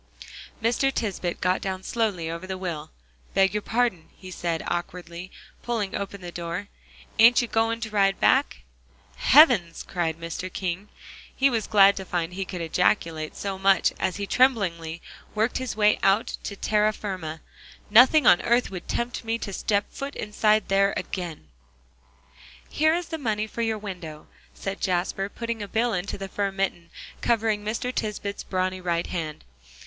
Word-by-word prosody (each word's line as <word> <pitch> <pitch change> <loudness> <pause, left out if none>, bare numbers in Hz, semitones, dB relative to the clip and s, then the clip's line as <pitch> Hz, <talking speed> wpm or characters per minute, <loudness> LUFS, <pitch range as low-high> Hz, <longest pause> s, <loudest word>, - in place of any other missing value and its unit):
Mr. 245 +4 +2
Tisbett 195 -8 -2
got 180 +1 +1
down 190 -1 -4
slowly 205 -9 -1
over 170 +3 -5
the 190 0 -4
wheel. 170 -5 -5 0.5
"Beg 195 0 +4
your 210 - -1
pardon," 225 -8 0
he 185 -1 -10
said 170 -2 -2
awkwardly, 175 0 -5 0.3
pulling 225 -5 -2
open 200 0 -4
the 175 -1 -7
door, 175 +4 -5 0.5
"ain't 235 +2 +8
you - - -3
goin' 225 +1 +1
to 220 -1 -4
ride 195 -2 +2
back?" 65 - +3 0.6
"Heavens!" 245 - +5
cried 165 -3 -2
Mr. 165 +2 -5
King. 185 +2 -4 0.5
He 275 0 +3
was 225 -3 -1
glad 200 -1 +6
to 190 - -4
find 175 -1 -2
he 190 +1 -3
could 180 -2 -6
ejaculate 165 -2 0
so 195 -1 -4
much 195 -2 +3
as 190 -1 0
he 200 - -3
tremblingly 180 -10 +1 0.3
worked 220 +4 +1
his 260 -2 -4
way 210 -1 +3
out 195 +4 +2
to 200 - -4
terra 210 +1 +2
firma. 180 -7 -5 0.5
"Nothing 260 +7 +7
on 175 - +7
earth 240 -1 +2
would 180 -3 -7
tempt 240 +1 -2
me 225 0 -1
to 200 -3 -6
step 200 +1 0
foot 275 +1 -6
inside 215 0 +1
there 195 0 +3
again." 170 - -5 1.2
"Here 315 +2 +2
is 350 0 -3
the 320 -1 -4
money 215 -5 -1
for 220 +2 -5
your 225 -1 0
window," 180 -7 -8 0.3
said 195 0 -5
Jasper, 185 +1 -1
putting 230 0 -4
a 205 - -4
bill 225 +3 0
into 180 +1 -3
the 195 0 -5
fur 200 0 -2
mitten, 190 -3 -2 0.3
covering 220 -3 +1
Mr. 230 +4 -2
Tisbett's 205 -3 -3
brawny 185 0 -2
right 170 -1 0
hand. 160 -4 -5
195 Hz, 165 wpm, -25 LUFS, 180-225 Hz, 1.2 s, ain't